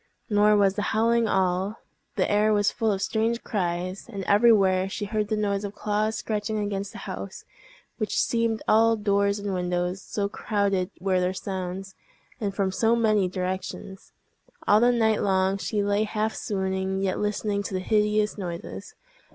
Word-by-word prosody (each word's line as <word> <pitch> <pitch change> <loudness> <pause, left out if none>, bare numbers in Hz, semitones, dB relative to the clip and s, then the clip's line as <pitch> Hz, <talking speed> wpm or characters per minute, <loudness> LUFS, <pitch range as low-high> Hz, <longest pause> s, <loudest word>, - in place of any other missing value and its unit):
Nor 210 0 +5
was 195 -2 +4
the 210 - -2 0.2
howling 230 +1 +3
all; 190 +2 0 0.4
the - - +1
air 210 +1 +3
was 205 -1 +2
full 225 -1 0
of 195 -1 -1
strange 225 +3 0
cries; 185 0 -3
and 200 -4 -5
everywhere 195 -3 +4
she 205 - -4
heard 210 0 -1
the 215 0 -1
noise 200 -1 0
of 205 0 -5
claws 215 +1 -1
scratching 215 0 -2
against 200 -1 -3
the - - -10
house, - - -7 0.5
which 215 - -1
seemed 230 -1 0
all 225 +1 +5
doors 200 -1 +1
and 200 -1 -3
windows, 180 +1 -1
so 200 0 -2
crowded 200 -2 -1
were 185 0 +1
the 180 +1 0
sounds, 190 0 -5 0.5
and 200 -4 -3
from 195 -2 0
so 225 +4 +2
many 215 -4 +2
directions. 185 +1 -5 0.6
All 210 - +6
the 240 +2 +5
night 220 -3 +2
long 190 0 +1
she 205 0 -1
lay 205 +1 +1
half 215 +1 -1
swooning, 190 -1 -2
yet 190 -1 0
listening 210 0 -1
to 200 - -6
the - - 0
hideous 210 +1 +1
noises. 175 -3 -6
205 Hz, 170 wpm, -26 LUFS, 190-215 Hz, 0.6 s, All